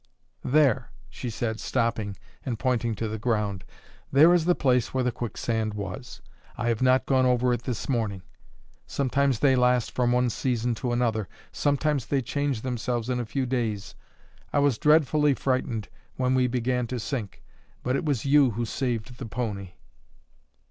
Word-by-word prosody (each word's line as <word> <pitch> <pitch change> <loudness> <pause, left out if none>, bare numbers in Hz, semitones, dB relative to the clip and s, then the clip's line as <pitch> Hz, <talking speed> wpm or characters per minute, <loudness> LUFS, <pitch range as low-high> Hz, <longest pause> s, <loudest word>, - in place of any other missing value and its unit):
"There," 140 -3 +3 0.2
she 125 - -5
said, 110 0 -3
stopping 110 -5 -1 0.3
and 120 -4 -3
pointing 120 -2 0
to 110 +2 -3
the 110 0 -4
ground 105 -5 -1 0.5
"there 155 +6 +7
is 170 -3 +3
the 180 0 +4
place 125 -3 +1
where 130 - +2
the 125 - +1
quicksand 110 -2 -2
was. 105 +6 -7 0.3
I 120 - 0
have 115 0 0
not 130 0 +4
gone 130 -1 +3
over 125 0 +3
it 120 0 -4
this 125 -4 -3
morning. 110 -8 -1 0.6
Sometimes 140 -1 +1
they 135 -2 +5
last 125 -1 +2
from 125 -1 +1
one 125 0 +2
season 120 0 0
to 120 +1 -3
another; 115 -4 0 0.2
sometimes 145 -2 0
they 135 -2 0
change 140 -2 -1
themselves 125 -1 -2
in 125 - 0
a 120 - -3
few 135 +3 -1
days. 115 -6 -2 0.6
I - - 0
was 140 -5 +3
dreadfully 150 -1 +4
frightened 125 -6 -1 0.3
when 130 0 +1
we 130 -1 +3
began 125 0 0
to 125 +1 -3
sink, 115 -3 -5 0.4
but 125 +1 0
it - - -1
was 140 -7 -1
you 140 -1 +5
who 120 - 0
saved 120 0 -3
the 125 - -5
pony." 100 -6 -4
125 Hz, 170 wpm, -26 LUFS, 115-130 Hz, 0.6 s, there